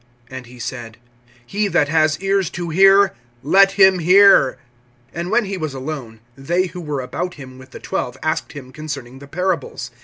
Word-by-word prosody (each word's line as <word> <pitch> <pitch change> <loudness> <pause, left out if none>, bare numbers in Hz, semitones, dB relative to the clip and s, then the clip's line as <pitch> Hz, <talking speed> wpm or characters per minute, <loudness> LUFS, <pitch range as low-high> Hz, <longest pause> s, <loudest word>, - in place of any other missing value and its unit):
(9)And 130 -2 -8
he 125 +1 -14
said: 120 -2 -7 0.5
He 205 +10 -1
that 145 -6 +1
has 155 0 +1
ears 195 -2 0
to 170 -1 -6
hear, 195 +3 +5 0.3
let 195 +6 +4
him 190 -2 +5
hear. 185 -5 +5 0.6
(10)And 170 +1 -4
when 230 +2 +2
he 195 0 -4
was 155 -5 -5
alone, 130 -5 -7
they 175 +7 -1
who 180 0 -8
were 150 -4 -4
about 175 +8 -5
him 130 -3 -12
with 130 0 -14
the - - -11
twelve 125 +1 -4
asked 155 - -2
him 130 -3 -10
concerning 135 -3 -8
the 140 - -13
parables. 160 -7 -3
155 Hz, 180 wpm, -19 LUFS, 130-190 Hz, 0.6 s, hear